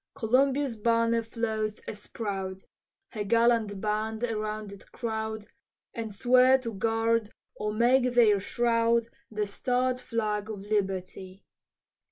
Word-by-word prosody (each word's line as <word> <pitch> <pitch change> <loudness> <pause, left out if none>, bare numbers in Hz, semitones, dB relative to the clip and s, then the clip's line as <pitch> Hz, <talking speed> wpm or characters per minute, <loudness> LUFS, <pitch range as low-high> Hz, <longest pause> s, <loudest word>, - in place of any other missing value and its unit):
Columbia's 265 +2 +2
banner 230 +1 +2
floats 220 -2 -3
as 210 -1 -7
proud, 195 -3 -4 0.5
Her 210 - -3
gallant 230 -1 +2
band 215 +2 -2
around 215 -2 -3
it 200 - -15
crowd, 220 -2 -4 0.5
And 225 -3 -5
swear 255 +4 +5
to 235 -3 -6
guard 225 +1 0 0.2
or 210 0 -2
make 245 +3 +3
their 215 -4 +5
shroud 230 +2 +1 0.2
The 210 -1 -2
starred 250 +4 -1
flag 215 -3 -2
of 205 -3 -6
liberty. 190 -2 -3
220 Hz, 120 wpm, -28 LUFS, 210-235 Hz, 0.5 s, swear